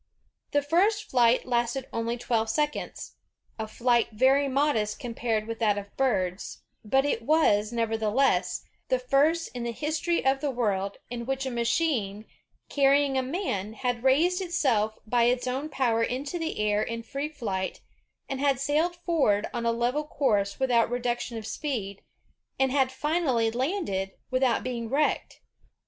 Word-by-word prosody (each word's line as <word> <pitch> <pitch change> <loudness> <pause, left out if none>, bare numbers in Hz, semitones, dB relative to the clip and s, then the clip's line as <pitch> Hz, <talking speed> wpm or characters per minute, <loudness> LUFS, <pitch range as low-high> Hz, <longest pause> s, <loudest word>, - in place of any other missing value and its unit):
''The 290 -1 +1
first 410 +7 +2
flight 245 -1 +4
lasted 240 +1 0
only 230 +1 -1
twelve 225 -2 0
seconds, 295 +5 -2 0.4
a 220 - -3
flight 235 +1 +2
very 265 +5 +4
modest 260 -6 +1
compared 230 -4 -2
with 230 0 -5
that 210 -3 +2
of 200 0 -7
birds, 195 -8 -1 0.2
but 270 +6 +2
it 280 -5 0
was, 230 -7 +3
nevertheless, 220 -4 +1 0.2
the 255 - +2
first 285 +6 +2
in 245 - -5
the 235 0 -2
history 310 +6 -1
of 270 0 +2
the 295 - 0
world, 200 -6 -1
in 235 -1 -5
which 270 0 -1
a 260 - -2
machine 235 -4 0 0.4
carrying 280 0 +3
a 260 - +2
man 255 - -3
had 245 +1 -2
raised 335 +8 +3
itself 255 - +1
by 235 +2 +2
its 250 +1 +1
own 265 +4 -2
power 240 -6 +1
into 275 +8 -2
the 325 0 -3
air 210 0 +2
in 230 +1 -3
free 275 +5 -4
flight, 195 -10 -4 0.5
had 270 -1 0
sailed 305 +5 +1
forward 315 - +1
on 235 -1 -2
a - - +3
level 240 +6 0
course 205 -10 0
without 245 -4 +3
reduction 245 -1 -2
of 220 - -6
speed, 215 -8 -4 0.6
and 265 -1 +3
had 265 -1 +2
finally 265 -6 +1
landed 240 - -2 0.2
without 255 -2 +2
being 235 -3 -4
wrecked. 295 +4 0
250 Hz, 155 wpm, -27 LUFS, 225-285 Hz, 0.6 s, flight